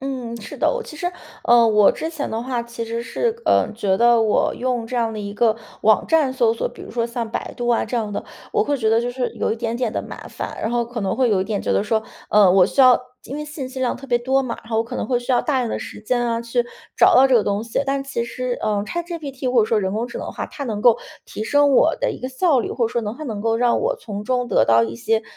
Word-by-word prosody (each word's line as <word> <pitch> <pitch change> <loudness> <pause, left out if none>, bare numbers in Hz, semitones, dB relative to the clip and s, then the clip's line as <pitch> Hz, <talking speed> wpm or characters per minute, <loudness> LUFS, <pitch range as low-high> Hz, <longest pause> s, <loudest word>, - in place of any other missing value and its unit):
嗯， 255 -4 -4
是 205 - -9
的。 - - +2
我 - - -3
其 315 - -11
实 350 - -3 0.4
呃， 235 -1 +6
我 210 -2 +5
之 320 - -4
前 310 -3 -4
的 225 +1 -3
话 250 -1 -2
其 235 0 -6
实 230 +1 -4
是， 460 - -2
呃， - - +3
觉 200 -4 0
得 235 +1 +5
我 220 -2 +2
用 250 -2 -2
这 250 - -4
样 230 -2 0
的 215 - -6
一 200 0 -5
个 220 +1 +2 0.3
网 215 0 +4
站 310 -5 +3
搜 240 -4 +2
索， 230 - -2
比 - - -13
如 - - -9
说 230 -1 -1
像 235 -1 -4
百 - - -4
度 240 0 -3
啊 235 - +2
这 245 - -3
样 215 -3 -2
的， - - -4 0.3
我 - - +2
会 285 - 0
觉 220 -4 +1
得 225 +1 +4
就 240 +1 -2
是 250 -1 -2
有 - - -1
一 - - -3
点 230 0 -2
点 240 -3 -1
的 - - -2
麻 - - -8
烦。 - - -6
然 220 - -1
后 240 0 +1
可 235 0 -6
能 190 -2 -1
会 255 -3 +2
有 195 -3 +2
一 - - 0
点 205 -1 -2
觉 - - 0
得 - - +1
说， 220 0 0 0.3
嗯， 205 -3 +6
我 185 -2 +6
需 275 - 0
要 255 -2 +7 0.2
因 275 - -6
为 300 - -4
信 295 -3 -6
息 260 0 -8
量 255 -1 0
特 270 - -12
别 240 -1 +3
多 265 +3 +1
嘛， 240 -3 -4
然 225 - -15
后 220 - +1
我 - - +3
可 230 - -6
能 - - -2
会 245 -2 0
需 245 - -5
要 250 - +4
大 285 -4 0
量 245 -2 -1
的 - - -2
时 - - -8
间， 245 +3 0
啊， 230 -1 -1
去 235 +1 -1 0.3
找 - - +6
到 270 +1 +7
这 260 - +4
个 220 - +2
东 205 +1 -1
西。 230 0 -2
但 275 0 0
其 275 -4 -3
实， 250 +1 -4
嗯 205 -1 0
，ChatGPT 290 -3 -4
或 245 - +5
者 - - +2
说 225 - +2
人 190 -1 -2
工 225 +4 -2
智 240 - -6
能 - - -5
的 - - -6
话， - - -4
它 280 - -7
能 215 -5 -3
够 240 +1 +5 0.3
提 215 - -6
升 290 +4 +3
我 310 +4 +4
的 - - +1
一 - - -6
个 255 - -4
效 270 +2 +2
率， 235 - -2
或 235 - +1
者 - - -4
说 235 - -1
能 215 +2 -4
它 310 - -9
能 220 -8 -4
够 225 +1 +1
让 240 0 +2
我 - - 0
从 205 - -7
中 250 +1 0
得 190 - +3
到 115 0 +4
一 115 0 -3
些， 220 - 0
235 Hz, 340 characters per minute, -21 LUFS, 220-260 Hz, 0.4 s, 要